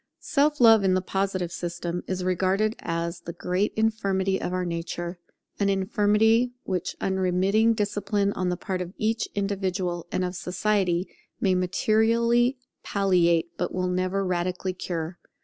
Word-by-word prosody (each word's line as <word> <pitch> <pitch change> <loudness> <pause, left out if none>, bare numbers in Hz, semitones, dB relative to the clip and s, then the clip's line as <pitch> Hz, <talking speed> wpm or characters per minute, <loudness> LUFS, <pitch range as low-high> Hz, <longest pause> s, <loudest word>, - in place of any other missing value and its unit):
Self 295 -1 +1
love 225 -4 +7
in 185 -1 +3
the 185 - +1
Positive 190 -2 -1
system 175 0 -4
is 185 -1 -2
regarded 190 +4 +1
as 170 +1 -3
the 170 0 -7
great 180 +5 -1
infirmity 195 -4 0
of - - -2
our 185 0 -1
nature: 175 +1 -4 0.4
an 200 -1 +2
infirmity 210 +4 +2
which 180 -2 -3
unremitting 190 +4 +2
discipline 205 -1 0
on 185 -1 -1
the 180 - -1
part 185 0 -3
of 180 +2 -6
each 225 +1 0
individual 190 -4 -2
and 185 - 0
of 180 - -3
society 180 0 0 0.3
may 190 - +2
materially 230 +7 +2 0.2
palliate, 175 -4 +2
but - - -2
will 185 0 0
never 185 +2 0
radically 180 +1 -1
cure. 175 -1 -4
190 Hz, 145 wpm, -26 LUFS, 180-210 Hz, 0.4 s, love